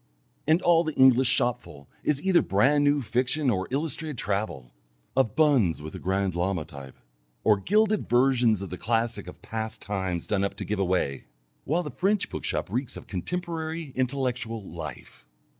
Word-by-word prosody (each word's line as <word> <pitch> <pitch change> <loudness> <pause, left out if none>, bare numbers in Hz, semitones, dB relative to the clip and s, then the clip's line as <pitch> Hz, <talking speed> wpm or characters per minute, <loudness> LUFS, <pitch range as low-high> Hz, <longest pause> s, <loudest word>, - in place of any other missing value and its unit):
And 160 +3 +3
all 170 -1 +5
the 155 -2 -4
English 130 -1 +6
shopful 120 - -1 0.2
is 150 0 0
either 190 -2 +4
brand 135 +9 +3
new 145 -1 +3
fiction 130 +4 +1
or 95 -3 -1
illustrated 150 +1 -2
travel 100 - -3 0.4
(of 120 -5 +2
'Buns 125 - +3
with 80 - -7
the - - -6
Grand 95 0 0
Lama' 90 -1 -1
type), 70 -2 -11 0.5
or 105 -2 +5
gilded 210 - +2
versions 120 -4 +3
of 95 - -7
the 90 - -6
classics 115 -3 -1
of - - -14
past 110 0 -4
times 95 -4 -3
done 100 -2 0
up 100 - -2
to - - -5
give 105 -1 -2
away. 90 -8 0 0.4
While 170 +5 +1
the - - -6
French 200 +1 0
bookshop - - -3
reeks 125 +2 -2
of - - -10
contemporary 160 - -4
intellectual 125 -5 -1
life! - - -8
120 Hz, 165 wpm, -27 LUFS, 95-145 Hz, 0.5 s, English